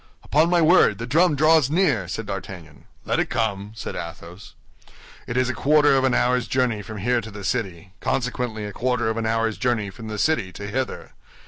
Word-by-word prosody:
"Upon 155 +4 +2
my 175 -1 +3
word, 155 - +5
the 115 - -5
drum 155 +5 +3
draws 155 -1 +4
near," 150 - +1
said 110 +5 -4
D'Artagnan. 90 -8 -8 0.2
"Let - - 0
it - - 0
come," 105 -3 -2
said - - -6
Athos. 85 +3 -9 0.7
"It 120 - -3
is 130 0 +2
a 130 - -1
quarter 145 +2 +4
of 135 - +2
an 130 - +2
hour's 125 0 +1
journey 125 -5 0
from 105 +2 -8
here 120 +4 0
to 110 - -9
the 105 -1 -9
city, 95 -4 -3
consequently 120 -4 -2
a 105 - -7
quarter 125 -1 0
of 110 - -4
an 115 -1 -1
hour's 115 -1 0
journey 110 -6 0
from 110 +2 -10
the 105 -1 -5
city 105 -7 0
to 100 - -7
hither. 125 +6 -4
115 Hz, 205 wpm, -23 LUFS, 100-130 Hz, 0.7 s, word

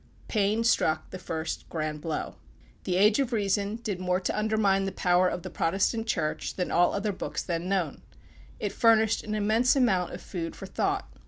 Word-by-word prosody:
Paine 215 +1 +1
struck 225 -9 +1
the 185 - -6
first 160 -2 -4
grand 155 -2 -3
blow. 160 -1 -3 0.5
The 180 - 0
"Age 205 +5 +4
of 270 -3 0
Reason" 205 -1 0
did 215 -5 -4
more 180 0 0
to 185 - -2
undermine 210 -2 +2
the 195 - -2
power 180 0 +3
of 180 - -4
the - - -7
Protestant 205 +6 0
Church 160 -8 -2
than 180 - -2
all 175 +1 +3
other 205 +1 -1
books 190 - -4
then 170 0 -3
known. 195 -3 -1 0.6
It - - -2
furnished 225 -1 +3
an 215 0 -3
immense 220 +5 +3
amount 195 -10 +2
of 175 - -6
food 165 -3 -5
for - - -8
thought. 390 - -1
195 Hz, 185 wpm, -28 LUFS, 180-220 Hz, 0.6 s, Age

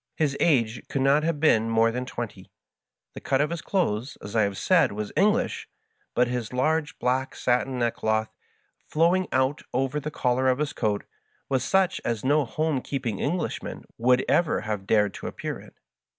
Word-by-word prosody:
His 145 -3 0
age 120 -8 +2
could 135 - 0
not 140 +2 +4
have 160 -1 -1
been 115 -7 +3
more 115 0 +3
than 125 +2 -4
twenty. 105 -7 -6 0.6
The - - -9
cut 135 -1 +1
of 150 +2 +1
his 170 -2 -3
clothes, 135 - -1
as 100 +2 -8
I 110 - +4
have 100 -2 0
said, - - +3
was 105 0 -4
English, 220 +5 +1 0.5
but 125 - +3
his 120 -2 -3
large 155 +6 0
black 130 +1 -1
satin 125 +1 0
neckcloth, 110 -2 0 0.6
flowing 175 +4 +2
out 130 +3 +1
over 135 +3 0
the 150 +1 -4
collar 130 -3 0
of 130 - +2
his 150 0 -2
coat, 105 -1 -1 0.5
was 130 -2 +1
such 190 +5 +2
as 115 0 -2
no 145 +1 +3
home 155 +3 -1
keeping 125 -8 -3
Englishman 175 +5 -3 0.2
would 125 +2 +3
ever 170 -2 +2
have 105 -2 -4
dared 105 -3 +3
to - - -7
appear - - -5
in. - - -14
130 Hz, 180 wpm, -26 LUFS, 115-150 Hz, 0.6 s, not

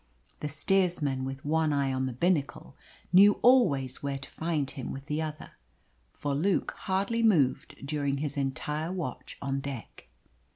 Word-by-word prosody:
The 150 - -3
steersman, 155 -5 +1
with 135 +1 -6
one 160 +1 +2
eye 140 -2 +1
on 130 0 0
the - - -3
binnacle, 150 +3 -1 0.4
knew 200 +3 +8
always 145 - +4
where 140 -1 -2
to 135 - -10
find 160 -4 -1
him 130 -3 -6
with 135 0 -7
the 150 +1 -2
other; 155 -1 -6 0.6
for 145 -1 -2
Luke 175 +7 +1
hardly 200 +5 -1
moved 160 - +2
during 140 -1 -1
his 145 -1 -3
entire 150 +4 -2
watch 170 -9 -5
on 135 0 -1
deck. 135 -4 -8
145 Hz, 155 wpm, -29 LUFS, 135-170 Hz, 0.6 s, knew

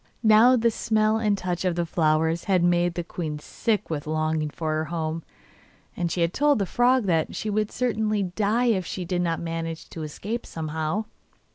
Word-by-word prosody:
Now 220 +3 +7
the 235 -1 +2
smell 215 0 +1
and 210 -2 +1
touch 180 -2 -3
of 180 -2 +1
the 170 0 0
flowers 160 0 +1
had 185 -3 +2
made 175 0 +2
the 175 - -2
queen 160 -3 -4
sick 210 +6 -2
with 150 -1 -3
longing 155 0 0
for 155 +1 -3
her 155 0 0
home, 160 0 -3 0.7
and 170 -1 -2
she 170 0 +2
told 290 - +2
the 200 - 0
frog 245 +5 +3
that 165 -4 0
she 215 - -3
would 215 0 0
certainly 215 -4 0
die 210 +6 0
if 190 -4 0
she 180 +1 -5
did 180 0 -1
not 165 -2 0
manage 165 -1 -4
to 165 - -7
escape 205 +10 -5
somehow. 160 +5 -3
175 Hz, 185 wpm, -25 LUFS, 160-215 Hz, 0.7 s, Now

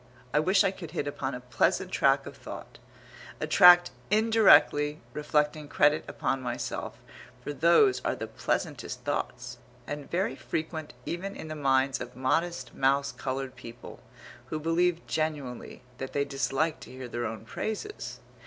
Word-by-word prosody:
I 150 - +4
wish 190 +6 +4
I 195 - +2
could 175 -4 -9
hit - - 0
upon 140 -2 -3
a 125 - -7
pleasant 125 -1 0
track - - +3
of - - -9
thought, - - -10 0.6
a - - -1
track 175 0 +8 0.2
indirectly 210 -9 +5
reflecting 150 0 0
credit 150 +1 +3
upon 135 0 -2
myself, 120 -1 -4 0.5
for 145 - -4
those 170 - +4
are - - 0
the - - -5
pleasantest - - -3
thoughts, - - -4 0.3
and 145 -1 -6
very 175 -6 0
frequent 160 +1 -4
even 195 +3 -4
in 160 - -8
the 155 - -4
minds 135 -2 +2
of 125 0 -7
modest 160 +7 -1
mouse 140 +1 +2
coloured 130 0 -4
people, 120 -1 -11 0.5
who 155 - -3
believe 170 +2 +1
genuinely 150 -6 -3 0.2
that 135 - -5
they 140 0 +1
dislike 140 +3 -1
to - - -11
hear 130 0 -7
their 120 -1 -3
own 110 0 -7
praises. 220 - -5
150 Hz, 155 wpm, -28 LUFS, 135-170 Hz, 0.6 s, track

